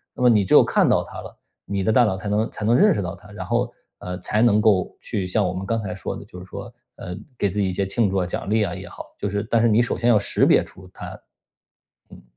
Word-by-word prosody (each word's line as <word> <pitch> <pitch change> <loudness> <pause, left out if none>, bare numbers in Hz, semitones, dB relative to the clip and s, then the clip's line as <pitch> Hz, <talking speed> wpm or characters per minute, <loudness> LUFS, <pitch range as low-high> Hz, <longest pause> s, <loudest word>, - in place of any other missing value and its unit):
那 - - -3
么 - - +6
你 105 -4 +4
只 - - 0
有 - - +9
看 - - +2
到 - - +3
它 - - -9
了， - - -12 0.3
你 100 -1 -2
的 110 - +2
大 125 - +6
脑 95 -4 -1
才 95 - -7
能 105 +2 0
才 105 - -5
能 115 +2 +4
认 210 +11 +5
识 - - -2
到 95 +1 -4
它， 105 +3 -17
然 95 -3 -7
后， 120 +4 0 0.3
呃， 90 0 -5
才 105 +4 0
能 110 -3 +4
够 100 -4 +2
去 95 -3 -3
像 100 +3 +1
我 90 - -1
们 95 +1 -5
刚 115 +1 0
才 95 -3 -4
说 95 - -5
的 - - -9
就 90 - -11
是 90 - -10
说， 100 +4 -8 0.3
呃， 90 -1 -6 0.2
给 100 - +1
自 105 - -3
己 100 - +1
一 - - -3
些 100 +2 -1
庆 110 +1 +1
祝 95 - -1
啊、 90 - +1
奖 95 - -4
励 110 0 +2
啊 95 -4 -3
也 - - -8
好， - - -9
就 100 - -3
是 100 +1 -2
但 115 - +3
是 115 - +4
你 110 +1 +4
首 120 - -1
先 120 - +1
要 110 -3 +5
识 100 - +1
别 - - +4
出 95 -1 -15
它。 - - -9 0.9
嗯。 - - -14
100 Hz, 315 characters per minute, -22 LUFS, 95-110 Hz, 0.9 s, 有